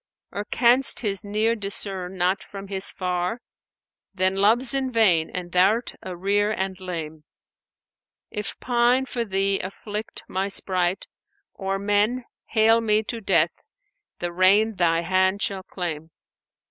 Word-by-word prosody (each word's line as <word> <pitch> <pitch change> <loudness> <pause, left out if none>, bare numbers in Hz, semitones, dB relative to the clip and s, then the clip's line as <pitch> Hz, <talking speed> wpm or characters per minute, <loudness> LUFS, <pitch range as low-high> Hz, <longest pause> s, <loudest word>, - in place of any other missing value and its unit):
Or 205 +1 -4
canst 245 +4 +4
His 200 -4 -1
near 215 +3 0
discern 195 -3 -4
not 180 +2 +1
from 195 -1 -10
His 195 -1 +1
far? 180 +4 -2 0.4
* - - -69
Then 185 0 +1
Love's 230 +6 +3
in 265 -1 -1
vain 185 -9 +3
and 180 -1 -6
thou'rt 200 +7 +2
a 185 - -7
rear 205 +3 +1
and 190 -3 -3
lame. 160 -4 -6 1.1
If 210 -1 -4
pine 245 +1 +2
for 245 -2 -3
Thee 195 -1 0
afflict 210 +3 -6
my 190 +1 -2
sprite, 185 -1 0 0.5
or 195 0 -3
men 205 +5 +1
* - - -69
Hale 225 +1 +5
me 215 -1 +2
to 230 +1 -5
death, 170 -5 +3 0.7
the 175 0 -3
rein 195 +5 +4
Thy 170 -3 +1
hand 190 +2 +1
shall 195 -1 -2
claim! 165 -4 -5
195 Hz, 145 wpm, -24 LUFS, 185-220 Hz, 1.1 s, Hale